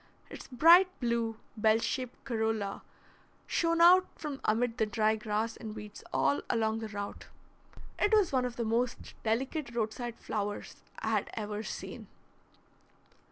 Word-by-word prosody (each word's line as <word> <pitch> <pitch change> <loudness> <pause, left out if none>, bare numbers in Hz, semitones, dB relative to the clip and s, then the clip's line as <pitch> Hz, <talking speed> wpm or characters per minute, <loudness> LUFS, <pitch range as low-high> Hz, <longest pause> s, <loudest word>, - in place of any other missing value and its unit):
Its - - -9
bright 335 +8 +7
blue, 235 -2 -1 0.2
bell 220 0 +4
shaped 250 +2 -3
corolla 220 -5 -1 0.6
shone 335 0 +1
out 365 +2 +7
from 295 -3 -6
amid 230 +2 +1
the 220 - +3
dry 215 +1 +2
grass 215 +1 -2
and 220 -1 -7
weeds 210 -1 -9
all 135 +2 +2
along 220 -1 +1
the 220 - -4
route. 205 -1 -6 0.7
It 415 - +2
was 420 -5 +4
one 260 -2 +2
of 245 -1 -4
the 235 - -2
most 235 +2 -1
delicate 240 +3 -2
roadside 235 +1 -2
flowers 205 -1 -4 0.2
I - - -3
had - - 0
ever 210 -1 -3
seen. - - -7
225 Hz, 145 wpm, -31 LUFS, 215-255 Hz, 0.7 s, bright